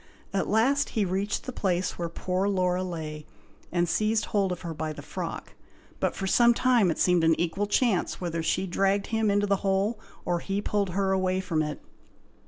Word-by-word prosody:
At 195 - 0
last 270 +7 +3
he 210 - +3
reached 195 +3 -1
the 255 - -5
place 185 -5 -1
where 170 -1 -2
poor 185 +3 -1
Laura 180 -2 +1
lay, 155 -4 -6 0.4
and 175 0 +1
seized 215 +5 +1
hold 200 -3 0
of 180 - -4
her 170 -2 -5
by 155 0 -3
the - - -9
frock; - - -6 0.5
but - - 0
for 195 - -3
some 235 +4 +5
time 240 -7 +3
it 160 - -1
seemed 180 -2 +3
an 165 0 +3
equal 185 +4 0
chance 210 -3 +1
whether 170 -2 -2
she 185 +4 0
dragged 195 +2 +1
him 220 -1 +2
into 205 0 +2
the 200 -1 +2
hole, 195 +3 0 0.3
or 175 -1 0
he 195 +3 -2
pulled 205 -1 0
her 195 -1 +2
away 185 -1 +1
from 170 -4 -1
it. 150 -1 -4
190 Hz, 195 wpm, -27 LUFS, 175-205 Hz, 0.5 s, some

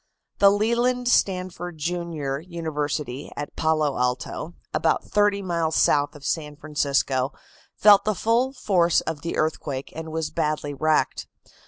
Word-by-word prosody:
The 200 - +8
Leland 235 +4 +1
Stanford, 180 -5 0
Jr., 160 -4 -3
University, 150 -5 -4
at 145 - -6
Palo 155 -4 +1
Alto 125 +6 -2 0.2
(about 160 - +1
thirty 205 -1 +1
miles 165 -3 -1
south 145 +1 +3
of 145 -1 -12
San 150 -1 -2
Francisco), 140 -3 0 0.4
felt 205 -1 +6
the 215 0 0
full 235 +6 +1
force 185 -10 +2
of 160 -2 -4
the 170 - -3
earthquake 145 -3 -2
and 160 0 -6
was 160 -1 -2
badly 150 -2 -1
wrecked. 155 +3 0
160 Hz, 135 wpm, -24 LUFS, 150-185 Hz, 0.4 s, The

